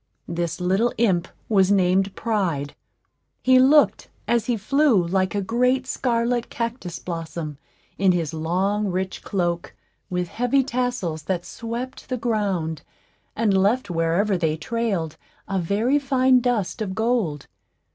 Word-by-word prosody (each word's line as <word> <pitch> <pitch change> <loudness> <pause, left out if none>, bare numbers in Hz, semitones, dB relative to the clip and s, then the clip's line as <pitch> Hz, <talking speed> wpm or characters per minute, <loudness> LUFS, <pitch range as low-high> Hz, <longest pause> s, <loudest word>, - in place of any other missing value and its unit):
This 170 0 -3
little 190 +7 +2
imp 185 -6 +2 0.2
was 195 -3 +3
named 190 0 +2
Pride. 180 -11 -1 0.7
He 255 0 +6
looked, 290 +3 +4 0.2
as 235 -2 +1
he 240 -2 +1
flew, 240 - +3
like 185 +2 0
a 200 - 0
great 250 +5 +1
scarlet 240 -2 0
cactus 230 -8 -4
blossom, 165 -3 -5 0.4
in 190 -1 +5
his 170 -3 -1
long 190 +6 0
rich 185 0 -3
cloak, 175 -3 -2 0.3
with 180 -1 -1
heavy 245 +3 +1
tassels, 245 - -2
that 180 -2 -2
swept 235 +3 -6
the 255 - -1
ground, 200 -9 -1 0.5
and 215 -3 +2
left 200 +2 +2
wherever 175 +4 +1
they 160 -2 0
trailed 185 -5 -2 0.3
a 195 -1 -1
very 215 - +1
fine 260 -2 +3
dust 235 -3 -1
of 190 -3 -3
gold. 220 - 0
200 Hz, 135 wpm, -23 LUFS, 175-240 Hz, 0.7 s, He